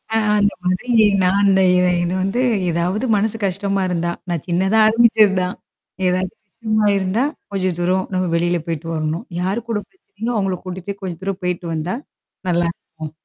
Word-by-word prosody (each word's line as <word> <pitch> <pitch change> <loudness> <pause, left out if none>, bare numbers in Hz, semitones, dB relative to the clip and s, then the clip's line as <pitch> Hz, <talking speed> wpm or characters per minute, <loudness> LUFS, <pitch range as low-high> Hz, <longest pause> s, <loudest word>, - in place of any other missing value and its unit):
On 220 -1 +2
அந்த 205 0 +2
மாதிரி 185 +7 -1 0.3
நான் 185 +2 +3
அந்த 190 -1 +4
இ - - +4 0.3
இது 175 +1 -1
வந்து 200 +6 0 0.3
ஏதாவது 180 +8 0
மனசு 220 +2 0
கஷ்டமாருந்தா. 185 -3 -1 0.2
நான் 170 -4 -2
சின்னதா 190 +5 +2
ஆரம்பிச்சது 220 -3 +5
தான். 180 0 -2 0.5
ஏதாது 185 0 0 0.2
விஷயமா 215 +1 0
இருந்தா, 195 +6 0 0.3
கொஞ்சம் 185 -3 -1
தூரம் 185 +2 +1
நம்ம 185 0 +1
வெளில 175 +1 +1
போய்ட்டு 165 0 -4
வரணும். 155 +7 -2
யார் 190 +5 0
கூட 215 -2 0
பிரச்சனையோ, 235 - -6
அவங்கள 190 -2 0
கூட்டிட்டு 185 +2 -5
கொஞ்சம் 180 -3 -5
தூரம் 195 -1 -3
போய்ட்டு 180 -1 -2
வந்தா, 160 +6 -2 0.5
நல்லாருக்கும். 170 -2 -2
185 Hz, 155 wpm, -20 LUFS, 175-205 Hz, 0.5 s, ஆரம்பிச்சது